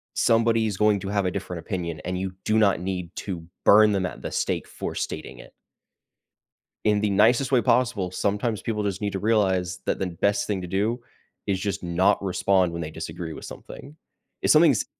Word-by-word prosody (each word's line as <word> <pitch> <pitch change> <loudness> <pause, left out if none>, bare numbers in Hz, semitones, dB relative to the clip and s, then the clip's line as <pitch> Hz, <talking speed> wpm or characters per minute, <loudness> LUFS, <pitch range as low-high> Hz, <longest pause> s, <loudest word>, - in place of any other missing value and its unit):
somebody's 115 -2 +2
going 105 -1 +3
to 95 - -5
have 100 -1 0
a 90 - 0
different 90 0 -5
opinion, 85 -3 -4
and 90 +1 -2
you 95 0 -4
do 110 - +2
not 100 -5 +3
need 90 -1 -4
to 90 -5 -5 0.2
burn 105 +1 +7
them 95 -2 0
at - - -6
the - - -5
stake - - -1
for - - -5
stating - - -5
it. - - -14 1.3
In 105 -1 +3
the 105 - +1
nicest 115 +7 +3
way 125 -3 +4
possible, 115 -6 +1
sometimes 105 +3 -1
people 105 -2 -2
just 100 -1 -2
need 105 -1 -1
to 95 - -2
realize 95 -4 +1
that - - -1
the 95 - -1
best 100 +4 0
thing 100 -3 -1
to 90 - -6
do 105 +7 0 0.5
is 95 -2 0
just 100 -1 -3
not 90 +3 +2
respond 95 -1 +2
when 85 0 -5
they 75 - -5
disagree 80 +1 -6
with - - -10
something. 145 +2 -11 0.5
If - - +3
something's 155 -8 +5
100 Hz, 195 wpm, -25 LUFS, 90-110 Hz, 1.3 s, burn